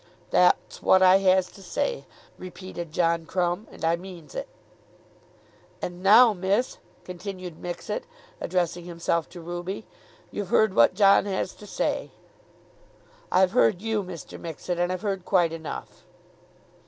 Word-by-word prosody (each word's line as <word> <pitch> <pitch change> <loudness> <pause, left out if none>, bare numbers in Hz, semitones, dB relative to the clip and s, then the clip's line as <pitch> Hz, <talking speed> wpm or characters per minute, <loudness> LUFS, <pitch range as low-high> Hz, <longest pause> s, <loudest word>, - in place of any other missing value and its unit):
"That's - - +3
what 190 0 +5
I 185 +1 +7
has 190 -1 +3
to 195 - -15
say," 485 - -2 0.3
repeated 185 -2 -8
John 165 0 +1
Crumb, 180 +3 -1
"and - - -6
I 165 +1 +3
means 180 -2 -11
it." - - -4 1.3
"And 175 0 -6
now, 220 +4 +7
miss," 200 +6 0 0.2
continued 180 -2 -7
Mixet, 175 - -4 0.3
addressing 175 -1 -1
himself 170 -1 -1
to 175 -1 -10
Ruby, 175 +5 -5 0.5
"you've 205 -3 -4
heard 220 -3 +3
what 115 +7 +5
John 200 -1 +5
has 190 -2 -2
to 210 - -13
say." - - -2 1.2
"I've 185 -1 +4
heard 115 +5 +3
you, 220 -2 0
Mr. 180 -3 -9
Mixet, 170 +2 -5
and 175 +1 +1
I've 185 +2 -4
heard 195 -3 -2
quite 175 -4 +2
enough." 160 -2 -7
185 Hz, 140 wpm, -26 LUFS, 175-195 Hz, 1.3 s, I